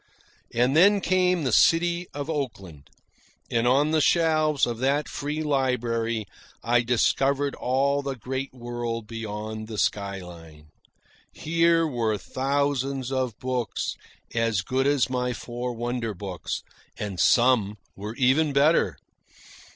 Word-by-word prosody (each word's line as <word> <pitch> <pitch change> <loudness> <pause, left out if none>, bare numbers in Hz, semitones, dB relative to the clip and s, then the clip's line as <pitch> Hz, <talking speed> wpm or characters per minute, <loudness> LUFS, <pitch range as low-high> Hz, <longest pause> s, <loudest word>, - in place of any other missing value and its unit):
And 125 +4 +2
then 200 +5 +6
came 180 -3 +2
the 130 - 0
city 170 +7 +3
of 145 0 -5
Oakland, 100 - -5 0.6
and 115 +1 +1
on 140 +5 +3
the 160 -1 +3
shelves 155 -2 +3
of 120 -1 -4
that 140 +3 +1
free 150 +2 -3
library 120 -6 0 0.4
I 120 +1 +3
discovered 135 +4 +1
all 140 +3 +1
the 140 -1 -4
great 130 +3 -4
world 120 -2 -5
beyond 110 -1 -6
the 110 -1 -7
skyline. 90 -7 -4 0.6
Here 165 +1 +2
were 115 -7 -1
thousands 135 +3 -1
of 130 -4 -1
books 125 -4 -2 0.4
as 115 -4 +1
good 130 +6 0
as 140 -2 +3
my 125 -1 -1
four 120 +1 -5
wonder 120 -2 -3
books, 90 -2 -5 0.3
and 100 -4 -5
some 115 -2 +3 0.2
were 105 +3 -7
even 140 +4 +2
better. 145 +4 +3
125 Hz, 125 wpm, -25 LUFS, 115-145 Hz, 0.6 s, then